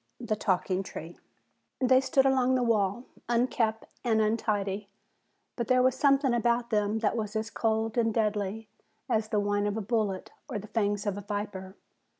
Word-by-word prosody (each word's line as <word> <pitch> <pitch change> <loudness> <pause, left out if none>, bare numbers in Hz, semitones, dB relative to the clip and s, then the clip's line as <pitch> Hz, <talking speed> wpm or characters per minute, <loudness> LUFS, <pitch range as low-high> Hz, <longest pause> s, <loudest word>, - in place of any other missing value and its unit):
THE 235 -3 -1
TALKING 190 -2 0
TREE 170 -3 -8 0.6
They 260 0 +5
stood 270 0 +2
along 260 -1 +3
the 250 - +2
wall, 215 -1 +1 0.3
unkempt 235 -2 +1 0.2
and 225 -3 +2
untidy, 210 -2 0 0.7
but 235 - -3
there 255 -1 +4
was 255 0 +4
something 275 -1 +3
about 235 0 +1
them 210 0 +1
that 220 0 +1
was 215 -2 -3
as 220 +1 -2
cold 225 +1 0
and 225 -1 +2
deadly 215 -1 -1 0.4
as 220 -1 +1
the 210 - +1
whine 205 0 0
of 205 +1 -2
a - - -1
bullet 210 -3 -1 0.2
or - - -3
the 205 - -7
fangs 205 -2 -1
of 205 -1 -1
a - - -7
viper. 200 -2 -5
220 Hz, 170 wpm, -29 LUFS, 205-240 Hz, 0.7 s, They